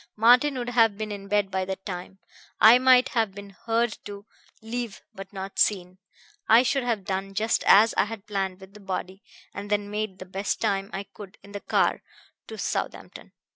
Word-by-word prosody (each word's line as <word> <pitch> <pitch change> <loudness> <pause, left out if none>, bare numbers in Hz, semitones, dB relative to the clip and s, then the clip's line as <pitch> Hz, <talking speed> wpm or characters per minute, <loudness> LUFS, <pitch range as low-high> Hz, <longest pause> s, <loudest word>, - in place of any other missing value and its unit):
Martin 250 +5 +4
would 245 -1 -3
have 225 -4 +3
been 215 0 -4
in 200 -1 -7
bed 205 -1 0
by 190 0 -1
that 190 0 -6
time. 185 0 -7 0.4
I 230 +3 +8
might 255 0 +5
have 220 -5 -1
been 200 0 -10
heard 230 +3 -1
to 200 0 -9 0.3
leave, 235 -1 -6
but 195 0 -10
not 195 -1 -7
seen. 185 -2 +1 0.5
I 230 +3 +7
should 265 +2 0
have 225 -6 -2
done 195 0 -4
just 220 +3 0
as 215 +2 +6
I - - +3
had 210 -1 -8
planned 195 -2 -3
with 190 +1 -14
the 210 - -13
body, 190 0 -5 0.3
and 200 0 -7
then 205 0 -1
made 210 -2 -3
the 185 - -9
best 195 +2 -3
time 195 0 -1
I 195 - -4
could 200 -1 -13
in 200 - -14
the 205 0 -7
car - - +1 0.5
to - - -8
Southampton. - - -5
205 Hz, 195 wpm, -25 LUFS, 195-225 Hz, 0.5 s, I